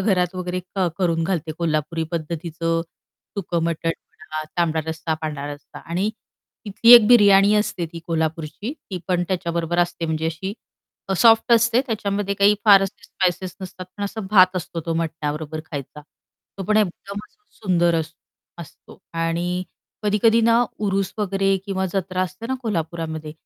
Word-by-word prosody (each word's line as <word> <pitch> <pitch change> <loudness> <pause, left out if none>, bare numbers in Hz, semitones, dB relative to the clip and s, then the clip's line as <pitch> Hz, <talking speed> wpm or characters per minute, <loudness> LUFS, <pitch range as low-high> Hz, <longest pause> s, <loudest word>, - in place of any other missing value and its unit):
घरात 185 -3 +1
वगैरे 180 0 -3 0.2
अ, 185 - +2
करून 170 -3 +1
घालते 165 -3 -2
कोल्हापुरी 160 0 -1
पद्धतीचं 165 0 -2 0.6
सुकं 170 -3 -1
मटण 165 0 -1
म्हणा, 155 -4 -8 0.2
तांबडा 160 -2 +2
रस्सा 160 0 -2
पांढरा 150 -2 -4
रस्सा 145 - -12
आणि 185 +6 -2 0.6
तिथली 230 +4 +6
एक 230 -3 +8
बिर्याणी 205 -3 +6
असते 210 -5 0
ती 165 - -6
कोल्हापूरची 160 - -2 0.2
ती 185 - -3
पण 180 -1 +2
त्याच्याबरोबर 170 -2 -1
असते 175 -1 0
म्हणजे 160 0 -1
अशी 165 +5 -4 0.6
अ, 195 - 0
सॉफ्ट 225 +3 +5
असते 235 +1 +4
त्याच्यामध्ये 200 -3 -1
काही 200 +1 +5
फार 200 -3 +8
असे 195 - -5
स्पाइसेस 185 0 -2
नसतात 185 -1 -8
पण 205 - -3
असा 220 +2 -4
भात 185 -2 +6
असतो 170 -1 -4
तो 165 - 0
मटण्याबरोबर 155 -1 -3
खायचा. 145 0 -6 0.6
तो 195 - -3
पण 215 +3 +1
एकदमच 200 +1 -2 0.3
सुंदर 175 -3 +2
अस 160 -1 -2 0.5
असतो 170 -4 -12
आणि 170 +2 -1 0.4
कधी-कधी 215 +2 +3
ना, 230 +1 +4
उरुस 195 -2 -1
वगैरे 195 -1 +1
किंवा 190 -1 -1
जत्रा 185 -1 -1
असते 185 +6 -5
ना, 260 - -1
कोल्हापूरामध्ये 160 -6 -3
180 Hz, 150 wpm, -22 LUFS, 165-200 Hz, 0.6 s, एक